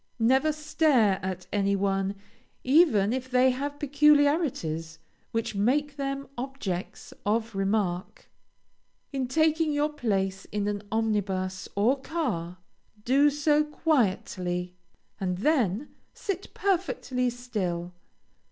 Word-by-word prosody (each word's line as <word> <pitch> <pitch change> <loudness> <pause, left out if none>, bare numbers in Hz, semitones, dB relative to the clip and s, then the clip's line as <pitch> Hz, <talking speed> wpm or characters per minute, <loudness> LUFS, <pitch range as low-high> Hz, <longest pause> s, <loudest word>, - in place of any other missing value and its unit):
Never 265 +6 +3
stare 295 -9 +2
at 185 -1 -4
any 200 -1 +2
one, 195 0 0 0.5
even 255 - +4
if 260 0 -3
they 255 +1 +4
have 285 +3 -4
peculiarities, 285 - +2 0.3
which 225 -1 -2
make 275 +8 +1
them 275 -1 -3
objects 245 -9 -5
of 225 +2 0
remark. 195 -2 -1 0.9
In 265 -2 -1
taking 315 +3 +2
your 295 +1 0
place 195 -7 -1
in 205 -1 -2
an 205 -1 -2
omnibus 200 -4 -1
or 245 +7 +2
car, 215 - -3 0.5
do 275 +4 +5
so 295 +1 +2
quietly, 190 - -1 0.5
and 180 -2 -1
then 245 - +1 0.3
sit 390 -1 -4
perfectly 330 -10 0
still. 190 -8 -3
240 Hz, 105 wpm, -27 LUFS, 195-290 Hz, 0.9 s, do